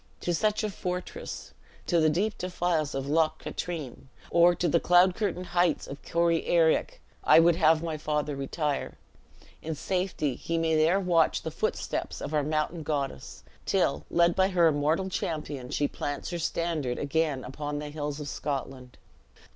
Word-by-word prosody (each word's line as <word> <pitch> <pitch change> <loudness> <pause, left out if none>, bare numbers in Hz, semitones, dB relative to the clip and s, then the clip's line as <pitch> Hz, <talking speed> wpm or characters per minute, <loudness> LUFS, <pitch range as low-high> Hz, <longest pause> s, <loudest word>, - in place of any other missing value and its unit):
To 175 - -1
such 210 +5 +1
a 210 - -1
fortress, 180 -1 -5 0.3
to 170 - +2
the 155 -1 +4
deep 200 +8 0
defiles 175 -5 -1
of 135 0 -2
Loch 155 +1 +2
Katrine, 155 -7 -6 0.2
or 175 +1 +5
to 175 - 0
the 170 - +3
cloud 180 +2 +5
curtained 185 -3 -2
heights 175 -3 +2
of 140 - -9
Corryarraick, 170 -1 +2 0.2
I - - +7
would 170 0 +5
have 160 -1 +4
my 160 -2 -3
father 150 -1 -2
retire. 140 +1 -3 0.6
In 160 0 -4
safety 180 -3 -1
he 165 +6 -3
may 165 -1 +1
there 160 +5 +4
watch 175 -4 +2
the - - -4
footsteps - - -3
of 155 - -5
our 150 - +3
mountain 155 +3 -1
goddess, 145 - -4 0.2
till, - - +1
led 170 0 +3
by 190 0 +4
her 180 -3 +3
immortal 155 +4 +2
champion, 150 -8 -4
she 145 - 0
plants 145 +4 -4
her 175 - -3
standard 160 -6 -1
again 145 -2 0
upon 145 +3 -5
the 150 0 -5
hills 145 -1 -4
of 150 - -6
Scotland." 135 -3 -5
160 Hz, 165 wpm, -28 LUFS, 145-175 Hz, 0.6 s, I